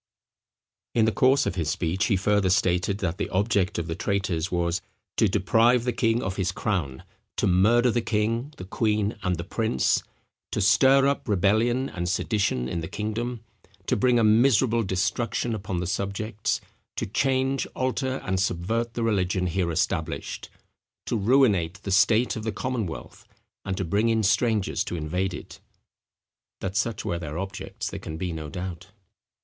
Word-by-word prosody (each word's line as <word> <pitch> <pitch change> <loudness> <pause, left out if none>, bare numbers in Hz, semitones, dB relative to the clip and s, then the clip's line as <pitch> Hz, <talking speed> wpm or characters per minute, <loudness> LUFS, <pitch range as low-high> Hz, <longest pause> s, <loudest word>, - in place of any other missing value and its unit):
In 115 -2 +4
the 110 - +2
course 130 +5 +3
of - - -1
his 85 -4 -2
speech 85 +4 0
he 105 - +2
further 100 0 +2
stated, 95 +1 +1
that 95 0 -2
the - - -2
object 100 0 +1
of 85 - -2
the 80 - -3
traitors 95 -2 -1
was 85 -1 0 0.4
"to - - +4
deprive 115 +5 +3
the 125 0 -1
king 115 +1 +1
of 95 0 -3
his 95 -1 0
crown; 90 -10 -2 0.3
to - - +1
murder 115 +7 +4
the 120 - 0
king, 115 +5 -1
the - - -7
queen, 105 +1 0
and 90 -1 0
the 85 - -4
prince; 100 - +1 0.5
to - - 0
stir 130 +7 +5
up 140 -1 -1
rebellion 110 +7 +2
and 90 -5 -4
sedition 95 - 0
in 85 +5 -3
the 80 - -5
kingdom; 115 +2 -4 0.4
to - - +1
bring 125 +3 +3
a 115 - +3
miserable 115 +1 +4
destruction 100 +4 -1
upon 95 -4 -3
the 90 - -2
subjects; 100 +3 -2 0.3
to - - -2
change, 130 +4 0
alter, 130 +1 -1
and 95 0 0
subvert 110 +6 -1
the 115 - -1
religion 95 -4 +1
here 90 0 0
established; 80 0 -2 0.6
to - - -1
ruinate 105 -6 +3
the 100 - -4
state 110 +5 +4
of 110 - -4
the 110 0 -2
commonwealth, 110 -6 -5 0.4
and 95 -1 -3
to 95 - -1
bring 105 +7 +1
in 110 -1 +2
strangers 110 0 +1
to - - -5
invade 90 +4 -2
it." - - -10 1.0
That 95 0 -4
such 110 +1 -1
were 85 - -1
their 75 -2 -5
objects 95 +1 -5
there - - -5
can 80 - -7
be 90 0 -3
no 80 -2 -6
doubt. 90 +1 -6
100 Hz, 170 wpm, -26 LUFS, 90-115 Hz, 1.0 s, stir